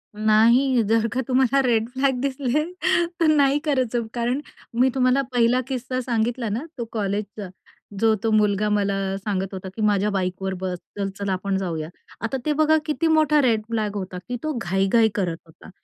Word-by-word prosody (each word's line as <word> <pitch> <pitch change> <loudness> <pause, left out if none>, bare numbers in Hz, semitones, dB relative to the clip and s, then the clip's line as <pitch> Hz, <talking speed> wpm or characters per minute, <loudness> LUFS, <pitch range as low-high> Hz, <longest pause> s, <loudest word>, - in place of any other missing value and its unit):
नाही, 230 +4 +4
जर 225 +1 +2
का 260 - 0
तुम्हाला 260 +1 +3
रेड 225 -1 +2
फ्लॅग 265 0 0
दिसले 275 +1 0 0.6
तर 330 - +3
नाही 290 -2 +4
करायचं, 250 -5 0
कारण 245 +3 -1 0.4
मी 260 +1 +5
तुम्हाला 255 +1 +3
पहिला 245 +1 +3
किस्सा 255 -1 -3
सांगितला 235 -1 -1
ना 235 +9 -3
तो 235 - -3
कॉलेजचा, 205 -1 -3 0.5
जो 225 -1 +4
तो 225 - +1
मुलगा 210 -1 +2
मला 200 -1 +1 0.2
सांगत 195 -1 -3
होता, 190 0 -6
की 220 - -5
"माझ्या 210 -1 +2
बाईकवर 190 0 -2
बस, 180 -1 -2 0.2
चल-चल 200 0 -3
आपण 190 +1 -1
जाऊया". 165 -4 -3 0.3
आता 230 +4 -2
ते 300 - +2
बघा 310 +1 +3
किती 315 +1 0
मोठा 310 -2 +4
रेड 230 -5 +2
फ्लॅग 215 -3 -2
होता 185 -2 -5
की 245 - -2
तो 310 - -1
घाई-घाई 195 +5 +2
करत 175 -5 -1
होता, 160 - -16
225 Hz, 170 wpm, -23 LUFS, 200-260 Hz, 0.6 s, मी